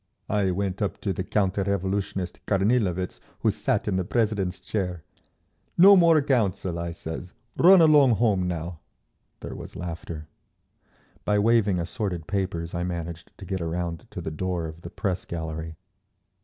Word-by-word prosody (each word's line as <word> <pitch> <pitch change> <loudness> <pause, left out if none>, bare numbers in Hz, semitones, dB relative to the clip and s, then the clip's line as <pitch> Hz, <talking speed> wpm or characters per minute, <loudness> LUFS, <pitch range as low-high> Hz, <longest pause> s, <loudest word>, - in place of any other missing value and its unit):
I 100 -2 +2
went 95 +2 -2
up 100 - -1
to 100 - -1
the 95 - -3
counter 100 0 0
revolutionist 95 -1 -2
Kornilovitz 100 -3 +1 0.2
who - - +3
sat - - -1
in 95 -3 +1
the 95 - +1
president's 105 -3 0
chair. 90 -6 -3 0.7
'No 195 +3 +9
more 165 -5 +5
Council,' 100 -10 0
I 85 0 -3
says. 85 +1 -7 0.2
'Run 185 +1 +7
along 145 -6 +6
home 100 -6 +2
now!'" 85 -1 -4 0.6
There - - -6
was - - -9
laughter. 85 -2 -6 1.0
By 105 - +2
waving 105 -2 +3
assorted 90 -1 -3
papers 95 -4 -2
I 85 - -2
managed 85 -1 -5
to - - -9
get 95 -2 -3
around 85 0 -3
to - - -6
the 80 - -4
door 90 +1 -2
of 80 +1 -8
the 85 - -8
press 95 0 -2
gallery. 80 -1 -5
95 Hz, 155 wpm, -26 LUFS, 85-105 Hz, 1.0 s, No